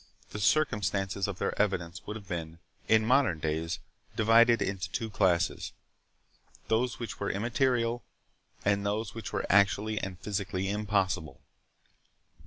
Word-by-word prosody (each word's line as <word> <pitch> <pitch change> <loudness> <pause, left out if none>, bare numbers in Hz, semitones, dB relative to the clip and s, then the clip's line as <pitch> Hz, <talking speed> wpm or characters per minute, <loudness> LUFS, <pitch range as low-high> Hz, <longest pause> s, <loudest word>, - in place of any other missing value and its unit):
The 105 - -5
circumstances 100 -7 +1
of 100 -3 -4
their - - -1
evidence 85 -5 -2
would 105 - -4
have 105 -3 -9
been, 85 -2 -5 0.3
in 110 0 +4
modern 130 - +3
days, 80 +1 -2 0.4
divided 115 +1 +5
into 95 -2 -2
two 110 +3 -3
classes—those 100 +5 -2
which 120 - -6
were 100 - -1
immaterial, 120 +1 0 0.6
and 100 0 +2
those 105 0 -2
which - - -6
were - - -2
actually 105 +2 +3
and 95 -2 -5
physically 95 -1 -2
impossible. 100 -6 -1
100 Hz, 125 wpm, -30 LUFS, 95-110 Hz, 0.6 s, divided